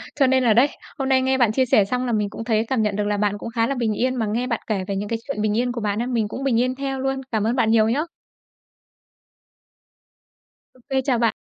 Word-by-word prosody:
cho 275 -2 +3
nên 260 0 +3
là 230 -3 +4
đấy, 245 +6 +5 0.3
hôm 270 -1 -2
nay 260 -1 +4
nghe 265 0 +1
bạn 240 -4 +3
chia 260 +4 +2
sẻ 210 -4 +4
xong 250 +5 -2
là 245 - -1
mình 210 -2 0
cũng 220 - -7
thấy 225 -1 +1
cảm 260 -3 0
nhận 210 -2 0
được 210 - 0
là 205 0 0
bạn 205 0 0
cũng 230 - -6
khá 230 -1 0
là 275 - -1
bình 230 -4 0
yên 255 +5 0
mà 230 -3 -1
nghe 230 +4 -1
bạn 230 -3 -1
kể 200 -4 -1
về 200 - -2
những 205 +1 -3
cái 230 - -2
chuyện 275 -7 -3
bình 210 0 0
yên 245 +1 +1
của 240 -1 -5
bạn 205 0 -1
ấy, 240 - -2
mình 230 -4 0
cũng 260 +6 -6
bình 250 -4 +2
yên 255 +1 0
theo 270 0 -3
luôn. 270 0 -1
Cảm 220 -3 0
ơn 235 - +1
bạn 225 -4 +2
nhiều 220 -1 +4
nhá. 265 +6 +1 2.7
Ô 255 - -22
kê. 265 -1 +1
chào 260 -4 +2
bạn. 230 -2 +2
235 Hz, 275 wpm, -22 LUFS, 215-260 Hz, 2.7 s, đấy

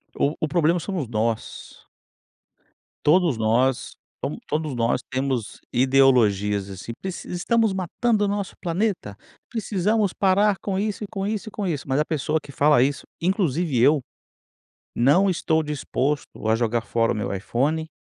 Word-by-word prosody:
O 145 +3 +1
o 155 - 0
problema 170 +2 +2
somos 175 -7 -3
nós. 110 0 -3 1.2
Todos 165 -4 +4
nós 120 +4 +1 0.3
to - - -2
todos 150 -2 -2
nós 115 +1 +1
temos 130 -4 -2
ideologias 115 -7 +3
assim, 95 +4 -7
preci 190 -2 -6
"Estamos 220 +5 +1
matando 205 +4 0
o - - 0
nosso 200 -1 -3
planeta, 180 - -2 0.3
precisamos 210 -2 0
parar 200 +1 +3
com 195 -2 -2
isso, 210 0 -2
e - - -4
com 195 -2 -3
isso, 215 +1 -3
e - - -19
com 200 -3 -3
isso". 145 -5 -3
Mas 135 +2 +1
a 150 - +2
pessoa 155 0 -1
que 140 - -12
fala 145 -2 +4
isso, 140 +2 0 0.2
inclusive 170 - 0
eu, 145 +3 +5 0.9
não 150 +11 +4
estou 160 -3 +1
disposto 145 -4 -2
a 110 - +4
jogar 115 0 0
fora 115 0 +1
o - - -4
meu 100 -1 -2
iPhone 145 +10 -1
150 Hz, 155 wpm, -24 LUFS, 125-190 Hz, 1.2 s, eu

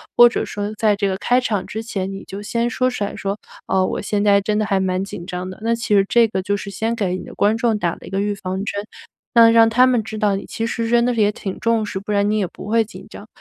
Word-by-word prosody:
“或 240 0 +8
者 - - -2
说 205 +1 -4
在 215 -1 +3
这 200 0 0
个 190 - -2
开 245 +5 +2
场 210 -6 -1
之 220 +1 -5
前， 195 -4 -3
你 195 0 -7
就 195 +1 -8
先 235 +3 -1
说 255 +1 +1
出 250 -5 -3
来， 200 - -3
说： 200 +1 -3 0.3
“哦， 190 -1 +2
我 - - -3
现 205 0 -1
在 200 -1 +5
真 210 +1 -1
的 215 - +1
还 195 -2 +1
蛮 185 0 0
紧 195 -3 -7
张 180 0 -5
的。 185 - -9
“那 230 +1 +1
其 225 -2 0
实 195 -1 +4
这 235 -1 +5
个 190 -3 -2
就 200 +2 -1
是 200 - -7
先 220 +4 -2
给 190 -5 -1
你 - - -8
的 - - -10
观 210 +2 +2
众 230 -2 +1
打 175 -4 0
了 - - -12
一 - - -9
个 195 - -2
预 205 0 0
防 190 0 -4
针， 205 0 -3 0.5
那 230 -1 +7
让 230 0 +6
他 250 +3 +5
们 245 -3 +2
知 220 +1 -7
道 205 -2 +2
你 195 - -5
其 225 - -4
实 230 -1 -2
真 235 0 +4
的 245 +1 +1
也 210 -2 +3
挺 195 -2 -6
重 230 -1 +1
视， 200 -2 -4
不 205 +2 -6
然 205 0 +2
你 215 - +1
也 200 - +1
不 - - -11
会 225 +1 +2
紧 190 -2 -12
张。 205 - -11
210 Hz, 320 characters per minute, -20 LUFS, 195-230 Hz, 0.5 s, 或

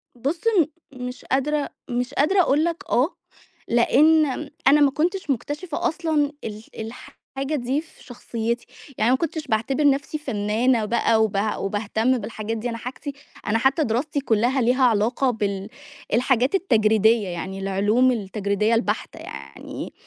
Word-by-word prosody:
بُص 280 +8 -2
م 400 -8 +4 0.4
مش 250 0 -8
قادرة 285 +2 0 0.2
مش 245 +2 -2
قادرة 370 +8 +3
أقول 300 -2 +2
لك 340 -1 -2
آه، 265 +9 +2 0.5
لإن 295 +4 +4
م 280 - -14 0.2
أنا 295 +2 +6
ما 280 - +5
كنتش 340 +4 -1
مكتشفة 290 +6 -2
أصلًا 310 -3 0
ال 215 0 -6 0.7
الحاجة 275 +3 -1
دي 265 +3 -1
في 325 - -20
شخصيتي 235 -1 -4 0.3
يعني 220 +3 +3
ما 260 - +4
كنتش 320 0 -3
باعتبر 230 +7 0
نَفْسي 280 +2 -1
فنانة 225 -2 +1
بقى، 225 0 +2
وبع 210 0 0
وباهتم 220 +5 0
بالحاجات 220 0 -4
دي. 235 +3 -3
أنا 230 - -4
حاجتي 260 +4 -6 0.3
أنا 215 +1 +2
حتى 265 +7 +2
دراستي 275 +5 -1
كلّها 245 +1 +1
ليها 250 +3 +2
علاقة 240 +3 +2
بال 200 -3 -2 0.4
الحاجات 255 - +2
التجريدية، 220 - +3
يعني 185 +2 -5
العلوم 205 +6 +2
التجريدية 205 0 0
البحتة 225 -4 -2
يعني 70 0 -8
245 Hz, 145 wpm, -23 LUFS, 220-285 Hz, 0.7 s, أنا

